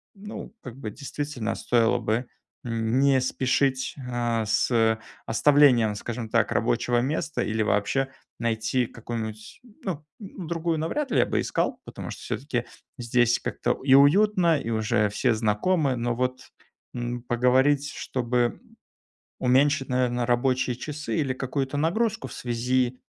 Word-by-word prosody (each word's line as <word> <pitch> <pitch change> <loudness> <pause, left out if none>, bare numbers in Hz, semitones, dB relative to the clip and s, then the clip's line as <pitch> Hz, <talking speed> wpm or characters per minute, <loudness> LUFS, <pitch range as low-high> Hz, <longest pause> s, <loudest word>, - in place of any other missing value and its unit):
ну, 210 +2 -8
как 125 -1 -9
бы, 130 -6 -5
действительно, 140 -5 -4
стоило 120 0 +2
бы 115 +2 -1 0.4
н 115 +1 0
не 135 -1 +4
спешить, 130 +1 0
а, 120 -2 0
с 110 +1 +2 0.3
оставлением, 125 -4 +5
скажем 115 +2 -5
так, - - +2
рабочего 120 - +1
места 150 +3 -2
или 110 0 -1
вообще 110 +6 +1 0.3
найти 115 +2 0
какую-нибудь 110 - -7 0.2
ну, 160 -5 -4
другую 170 -5 -3
навряд 270 - -2
ли - - +3
я - - +5
бы - - -1
искал, - - -1
потому - - -8
что - - -9
всё-таки 125 -3 -3 0.3
здесь 120 0 +2
как-то - - -2
и 135 -1 +4
уютно 170 +3 +5
и 115 - -5
уже 110 -2 +1
все 120 +4 +1
знакомы. 130 - +1
Но 120 0 -1
вот, 130 +1 -3 0.5
м, 120 0 -3
поговорить, 130 +4 +3
чтобы 120 -2 -1 0.8
уменьшить 135 +2 +3
наверно 125 -1 +1
рабочие 125 +1 +1
часы 150 +5 -4
или 135 -4 0
какую-то 135 +2 -3
нагрузку 220 +9 0
в - - -10
связи, 125 +1 -1
125 Hz, 135 wpm, -26 LUFS, 115-145 Hz, 0.8 s, оставлением